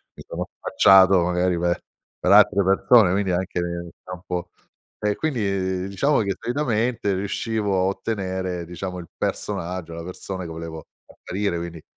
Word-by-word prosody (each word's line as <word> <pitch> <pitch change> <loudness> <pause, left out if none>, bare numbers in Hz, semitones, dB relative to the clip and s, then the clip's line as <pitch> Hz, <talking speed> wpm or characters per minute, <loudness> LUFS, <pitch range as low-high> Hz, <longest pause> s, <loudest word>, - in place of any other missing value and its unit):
mi - - -11
sono - - -4
spacciato, 95 -1 +6
magari, 90 0 +1
per 85 0 +1 0.4
per 90 - +2
altre 105 -1 +6
persone, 95 +1 +5
quindi 100 -1 0
anche 90 0 -1
nel 85 0 -4
campo 90 -1 -5 0.5
E, 105 -1 0
quindi 140 -8 -1 0.4
di 95 - -4
diciamo 140 +9 +2
che, 100 -3 0
solitamente, 120 -4 0
riuscivo 100 +1 -1
a - - +2
ottenere 95 -3 -2
diciamo 90 +1 -5
il 85 - -9
personaggio, 85 -1 -3
la 85 - -6
persone 90 0 -6
che - - -8
volevo 80 -1 -7 0.2
apparire, 95 -2 -3
quindi 85 -2 -7
95 Hz, 150 wpm, -23 LUFS, 90-100 Hz, 0.5 s, spacciato